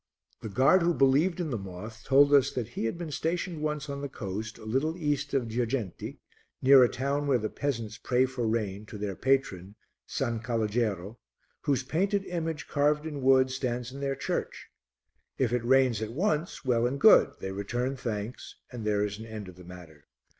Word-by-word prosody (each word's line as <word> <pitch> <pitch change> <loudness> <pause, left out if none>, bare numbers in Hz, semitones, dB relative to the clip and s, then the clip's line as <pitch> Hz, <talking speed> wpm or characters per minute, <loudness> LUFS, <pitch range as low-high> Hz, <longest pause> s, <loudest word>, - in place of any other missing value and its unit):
The 110 - -5
guard 135 - +4
who 170 0 +2
believed 145 +7 +3
in 165 -4 -2
the 120 - -2
moth 100 +4 -9
told 140 +2 +5
us 140 -1 +6
that 120 -3 -3
he 120 - -4
had 115 - -2
been 170 -3 -5
stationed 165 +1 -2
once 150 -1 -2
on 140 -1 -5
the 140 - -4
coast 110 -1 -5
a - - -12
little 140 +9 0
east 145 -3 -1
of 125 -4 +1
Girgenti, 115 -3 -3 0.4
near 135 0 +7
a 120 - +4
town 140 +3 -1
where 135 -3 +4
the 110 -2 -3
peasants 115 -6 -3
pray 125 +2 +2
for 125 -3 -3
rain 105 -2 -2
to 110 - -8
their 100 -2 -3
patron, 105 -8 0 0.3
S. - - -6 0.3
Calogero, 110 -3 -1 0.5
whose 140 -3 +1
painted 195 +8 0
image, 165 -3 -3
carved 150 +1 +1
in 150 -3 -5
wood, 130 0 +4
stands 125 -2 -3
in 135 - -8
their 140 -1 -1
church. 135 - -4 0.7
If 120 -3 +1
it 125 -1 0
rains 130 -3 +3
at 110 +1 -4
once, 155 -1 -1
well 120 -2 +2
and 135 +3 -3
good, 220 - +7
they 95 - -4
return 120 +7 -2
thanks, 115 -2 -5 0.2
and 120 -3 -6
there 105 -1 +1
is 105 0 -5
an 110 - -8
end 110 -3 -7
of 90 - -13
the 90 - -13
matter. 85 -4 -13
125 Hz, 195 wpm, -28 LUFS, 110-145 Hz, 0.7 s, near